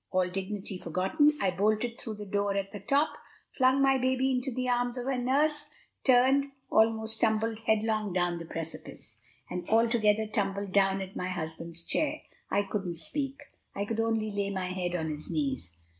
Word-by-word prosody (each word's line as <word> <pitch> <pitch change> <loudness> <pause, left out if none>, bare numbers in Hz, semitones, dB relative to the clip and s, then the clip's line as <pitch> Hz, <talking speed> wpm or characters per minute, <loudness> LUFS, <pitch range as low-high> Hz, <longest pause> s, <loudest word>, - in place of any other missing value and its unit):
All 185 -1 +2
dignity 190 +1 -4
forgotten, 185 - +2
I 195 -2 +2
bolted 215 +5 0
through 220 -2 -5
the 210 0 -7
door 200 0 0
at 195 0 -2
the 205 - -7
top, 280 +9 +2 0.5
flung 260 +1 +4
my 270 -1 +4
baby 260 +1 +2
into 255 +1 -1
the 255 +1 -2
arms 245 0 +1
of 245 - -3
her 270 0 0
nurse, 295 +4 +2 0.3
turned, 265 +2 +5 0.2
almost 220 0 +2
tumbled 220 0 +1
headlong 215 -1 +1
down 175 -1 0
the 170 - -7
precipice, 165 0 -7 0.3
and 180 0 -5
altogether 220 -1 +3
tumbled 200 -2 -2
down 195 0 +3
at 190 +1 -10
my 180 - -2
husband's 165 -1 -4
chair. 305 0 0 0.3
I 205 - +2
couldn't 195 -3 -3
speak; 275 - -3 0.3
I 200 - -1
could 225 +1 -3
only 225 -1 0
lay 200 -1 -1
my 190 -2 -2
head 180 -1 -2
on 160 -2 -1
his 150 0 -6
knees. 135 - -2
210 Hz, 175 wpm, -29 LUFS, 185-245 Hz, 0.5 s, turned